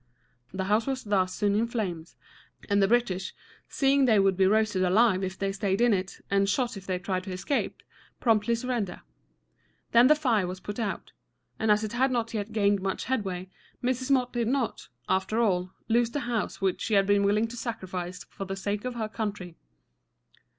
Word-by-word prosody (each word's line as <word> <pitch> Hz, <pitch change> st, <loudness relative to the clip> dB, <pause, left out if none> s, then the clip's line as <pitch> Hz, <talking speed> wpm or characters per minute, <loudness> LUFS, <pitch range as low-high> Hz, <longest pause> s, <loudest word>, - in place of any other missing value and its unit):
The 190 Hz, +1 st, -3 dB
house 210 Hz, +5 st, +1 dB
was 265 Hz, -1 st, -2 dB
thus 190 Hz, -3 st, +1 dB
soon 205 Hz, +1 st, 0 dB
in 220 Hz, +3 st, +1 dB
flames, 180 Hz, -9 st, -4 dB, 0.5 s
and 200 Hz, -1 st, +2 dB
the 195 Hz, -, +4 dB
British, 195 Hz, -5 st, 0 dB, 0.3 s
seeing 275 Hz, 0 st, +3 dB
they 225 Hz, -4 st, +4 dB
would 195 Hz, -1 st, +3 dB
be 190 Hz, 0 st, +4 dB
roasted 215 Hz, -2 st, +2 dB
alive 195 Hz, +1 st, +3 dB
if 190 Hz, 0 st, -3 dB
they 195 Hz, 0 st, -1 dB
staid 195 Hz, 0 st, -1 dB
in 240 Hz, -1 st, +4 dB
it, 185 Hz, -1 st, -3 dB
and 195 Hz, 0 st, +3 dB
shot 240 Hz, +2 st, 0 dB
if 195 Hz, -1 st, -10 dB
they 185 Hz, -1 st, 0 dB
tried 185 Hz, 0 st, -2 dB
to 190 Hz, -, -6 dB
escape, 185 Hz, +10 st, -2 dB, 0.4 s
promptly 225 Hz, -1 st, +2 dB
surrendered. 230 Hz, -6 st, -3 dB, 0.9 s
Then 235 Hz, +2 st, +7 dB
the 305 Hz, -, +6 dB
fire 235 Hz, -11 st, +1 dB
was 185 Hz, +1 st, -5 dB
put 205 Hz, +4 st, -6 dB
out, 210 Hz, -4 st, -3 dB, 0.5 s
and 220 Hz, -, 0 dB
as 210 Hz, +1 st, +4 dB
it 215 Hz, 0 st, -4 dB
had 260 Hz, +3 st, +2 dB
not 235 Hz, -3 st, -1 dB
yet 210 Hz, 0 st, -3 dB
gained 205 Hz, -2 st, +2 dB
much 190 Hz, 0 st, -2 dB
headway, 190 Hz, -7 st, -3 dB, 0.3 s
Mrs. 255 Hz, +1 st, -1 dB
Motte 255 Hz, -2 st, +2 dB
did 235 Hz, -2 st, 0 dB
not, 260 Hz, -1 st, -1 dB, 0.2 s
after 190 Hz, +4 st, 0 dB
all, 185 Hz, -5 st, +1 dB, 0.2 s
lose 235 Hz, 0 st, +3 dB
the 290 Hz, +4 st, -3 dB
house 235 Hz, -4 st, -2 dB
which 190 Hz, -2 st, 0 dB
she 220 Hz, -, 0 dB
had 195 Hz, -1 st, +4 dB
been 205 Hz, 0 st, +3 dB
willing 210 Hz, +3 st, +2 dB
to 240 Hz, -, -8 dB
sacrifice 185 Hz, -6 st, -5 dB
for 195 Hz, -, -8 dB
the 195 Hz, 0 st, -4 dB
sake 205 Hz, +3 st, -3 dB
of 250 Hz, -1 st, -3 dB
her 220 Hz, -2 st, -2 dB
country. 205 Hz, -6 st, -5 dB
210 Hz, 195 wpm, -27 LUFS, 190-235 Hz, 0.9 s, Then